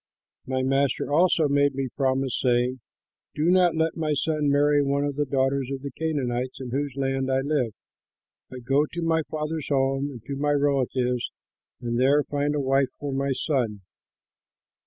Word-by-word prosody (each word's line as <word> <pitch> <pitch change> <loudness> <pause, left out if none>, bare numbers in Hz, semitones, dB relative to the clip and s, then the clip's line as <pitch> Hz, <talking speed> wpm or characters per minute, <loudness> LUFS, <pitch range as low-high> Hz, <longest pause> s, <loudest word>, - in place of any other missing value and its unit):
My 130 0 -1
master 135 +1 0
also 165 -1 +4
made 140 -1 +2
me 135 -1 -2
promise, 135 -2 0
saying, 125 0 +1 0.6
'Do 160 +4 +2
not 180 -3 +4
let 160 0 0
my 155 -2 -1
son 150 0 0
marry 145 +1 +3
one 140 0 0
of 145 -1 -2
the 145 0 -1
daughters 135 0 0
of 135 0 -5
the 140 - -5
Canaanites, 130 -5 -2
in 130 -2 -6
whose 140 0 -2
land 135 -1 -1
I 130 0 +2
live, 135 -5 0 0.8
but 125 -1 -9
go 140 +4 +2
to 170 - -4
my 165 0 +2
father's 155 0 -3
home 135 0 +1
and 120 -6 -10
to 140 +2 -4
my 145 +1 +1
relatives 130 -3 0 0.5
and 120 0 -2
there 140 +3 +4
find 145 +1 -1
a - - 0
wife 135 0 +2
for 145 -2 -4
my 140 +1 0
son.' 125 -7 -1
140 Hz, 175 wpm, -25 LUFS, 130-145 Hz, 0.8 s, also